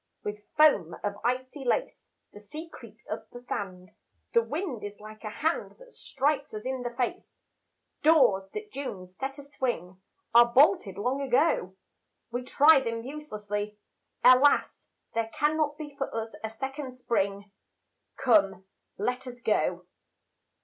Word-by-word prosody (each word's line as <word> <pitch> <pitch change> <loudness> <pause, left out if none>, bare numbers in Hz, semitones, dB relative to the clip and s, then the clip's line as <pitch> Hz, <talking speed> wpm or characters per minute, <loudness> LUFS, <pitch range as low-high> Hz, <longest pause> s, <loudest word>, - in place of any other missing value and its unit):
With 210 0 -4 0.2
foam 285 - +5
of 205 -1 -1
icy 255 +3 -2
lace 265 - -1 0.2
The 205 - -11
sea 305 +11 -8
creeps - - -14
up - - -5
the 245 0 -11
sand, 185 -2 -5 0.4
The 465 - +6
wind 305 - -4
is 205 0 -7
like 215 +1 -12
a 215 - -4
hand 315 +10 -1
That - - -16
strikes 280 - -1
us 215 - -6
in 260 0 -2
the 240 - -2
face. 240 0 -4 0.6
Doors 255 -12 +5
that 425 0 -6
June 205 -10 -5
set 265 +10 -6
a 285 - -9
swing 215 - -3 0.3
Are 235 0 +7
bolted 260 - +4
long 250 +7 -1
ago; 250 - +2 0.5
We 245 +1 -2
try 290 +4 +6
them 230 -3 -3
uselessly 210 -7 -5 0.5
Alas, 255 +3 +5 0.2
there 230 0 -1
cannot 295 0 +1
be 295 -2 -8
For 275 -1 -3
us 225 0 -3
a 220 - -2
second 265 +3 -6
spring; 200 -4 -1 0.7
Come, 200 -7 +3 0.3
let 250 +5 -2
us 245 -1 -8
go. 180 -5 +1
245 Hz, 145 wpm, -28 LUFS, 210-285 Hz, 0.7 s, Are